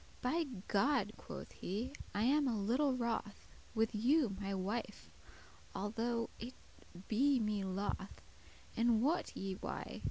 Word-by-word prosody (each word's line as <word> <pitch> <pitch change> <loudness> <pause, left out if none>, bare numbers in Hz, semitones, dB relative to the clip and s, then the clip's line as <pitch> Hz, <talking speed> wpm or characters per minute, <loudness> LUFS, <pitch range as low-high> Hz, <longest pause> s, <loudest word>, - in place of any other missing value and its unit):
"By 320 +7 +2 0.2
God," 275 +9 +3
quoth - - -8
he, 225 +9 -3 0.2
"I 205 - +2
am 280 +3 +4
a 230 -4 +1
little 255 +6 +2
wroth 230 -4 -2 0.3
With 225 0 +2
you, 240 0 +3
my 200 0 -2
wife, 200 +5 -3 0.6
although 230 +4 -1
it 245 +3 -6 0.5
be 265 +4 +4
me 210 -2 0
loth; 195 +1 -3 0.5
And 230 -1 +4
wot 320 +6 +1
ye 195 0 -2
why? 190 - -5
230 Hz, 130 wpm, -37 LUFS, 205-255 Hz, 0.6 s, am